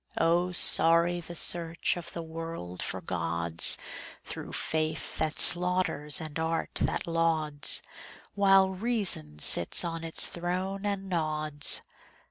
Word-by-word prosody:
Oh, 175 +2 0
sorry 170 0 +3
the 170 +1 -11
search 170 -1 +1
of 170 -1 -9
the 170 - -7
world 160 - -8
for 95 +1 -4
gods, 85 -1 0 0.5
Through - - -8
faith 155 0 -3
that 160 -1 -2
slaughters 175 -5 +3
and 155 -1 -7
art 160 0 -3
that - - -2
lauds, 160 -3 +1 0.5
While 195 -1 +3
reason 190 - -2
sits 85 - +3
on 165 -1 -5
its 165 -1 +2
throne 185 +3 -4
and 195 -1 -4
nods. 155 -4 +2
165 Hz, 120 wpm, -27 LUFS, 155-180 Hz, 0.5 s, sorry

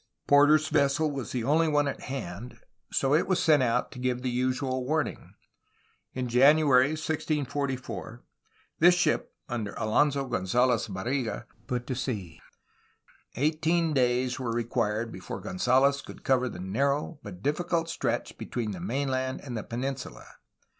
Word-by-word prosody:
Porter^s 145 +2 +5
vessel 140 +2 +2
was 135 -6 -5
the 125 -3 -2
only 155 +6 +3
one 145 -1 +2
at 140 - -4
hand; 120 -3 -6 0.3
so 135 +1 +1
it 155 - +3
was 185 -1 +2
sent 155 -3 +4
out 125 0 +1
to 125 - -9
give 125 0 -1
the 130 - -1
usual 130 +1 -1
warning. 155 +3 -2 0.8
In 130 -1 -2
January 135 +2 +5
1644, 140 -6 -3 0.6
this 175 +2 +7
ship, 175 - 0
under 115 -4 -4
Alonso 140 +5 +2
Gonzalez 120 +3 +1
Barriga, 110 - -3 0.2
put 125 -1 -2
to 130 - -3
sea. 105 - -4 1.0
Eighteen 160 +4 +1
days 125 0 +1
were 125 -3 -2
required 115 -1 -1
before 95 - -7
Gonzalez 130 +8 +2
could - - -12
cover 125 -1 +2
the - - -8
narrow 140 - -1
but 95 -5 -10
difficult 165 +3 0
stretch 165 - -3
between 115 -3 -3
the 95 - -6
mainland 130 +6 -2
and 125 -4 -6
the 110 - -2
peninsula. 130 +3 -5
130 Hz, 140 wpm, -28 LUFS, 120-145 Hz, 1.0 s, this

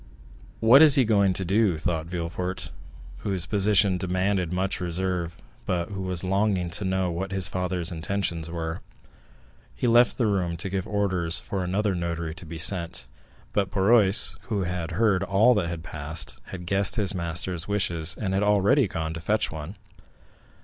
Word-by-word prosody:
"What 120 +6 +7
is 150 -3 +7
he 135 -4 +4
going 100 -3 +3
to 95 +1 -3
do?" 95 -2 +2
thought 80 0 -2
Villefort, 90 +2 -4 0.5
whose 95 -4 -1
position 100 -1 +2
demanded 95 0 -1
much 95 +1 -1
reserve, 90 -1 -3 0.3
but 85 -1 -1
who 95 -1 -5
was 90 -2 -2
longing 95 -2 0
to 95 - -2
know 95 -1 -1
what 95 +3 -4
his 95 -3 +1
father's 90 -1 -3
intentions 85 -1 -3
were. 80 -1 -5 0.9
He - - -3
left 120 0 +4
the 120 - +1
room 90 -5 -1
to 90 +4 -5
give 95 +1 -3
orders 95 -5 0
for 95 0 -4
another 100 +3 -1
notary 85 -2 -3
to 85 +1 -10
be 85 +1 -7
sent, 85 0 +3 0.5
but 100 -2 0
Barrois, 100 +1 +5
who 105 -4 -1
had 90 -1 -4
heard 100 0 +2
all 100 +6 +3
that 85 -6 -2
passed, 80 +1 -2
had 90 -2 -9
guessed 100 +2 +1
his 100 -2 +1
master's 85 -1 -2
wishes, 85 -5 0
and 95 -3 -2
had 95 - +1
already 105 +5 +3
gone 80 -3 -4
to 85 - -6
fetch 105 +5 0
one. 80 +5 -7
95 Hz, 165 wpm, -25 LUFS, 85-100 Hz, 0.9 s, What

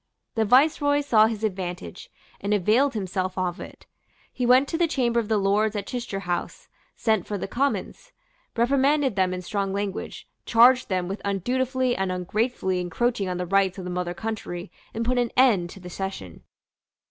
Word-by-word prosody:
The 225 -2 +1
Viceroy 285 +4 +4
saw 220 -6 +4
his 220 -1 -4
advantage, 185 - -4 0.3
and 205 +1 0
availed 230 +8 +2
himself 185 -2 -3
of 180 -2 -2
it. - - -11 0.5
He 250 -2 -1
went 255 +3 +5
to 325 - -1
the 340 - +3
chamber 240 -6 +1
of 225 - -3
the 220 -1 +2
Lords 205 +2 +1
at 200 -1 -3
Chichester 235 -5 -4
House, 175 -2 -4 0.3
sent 220 -5 0
for 205 - -3
the 195 - -4
Commons, 280 - -2 0.4
reprimanded 270 +1 +2
them 185 -2 +2
in 180 0 -4
strong 195 +1 -2
language, 200 -1 -4 0.2
charged 245 +2 +5
them 185 -2 -1
with 195 +3 -5
undutifully 250 +6 0
and 190 -1 -1
ungratefully 190 +1 -1
encroaching 195 +3 -1
on 180 - -2
the 180 - -2
rights 195 +1 +2
of 190 - -6
the 180 - -5
mother 180 -1 -3
country, 200 -4 -5 0.2
and 230 +1 -3
put 250 +1 +1
an 240 -1 +1
end 215 -10 +4
to 195 - -11
the 180 - -10
session. 180 - -6
210 Hz, 180 wpm, -25 LUFS, 185-245 Hz, 0.5 s, went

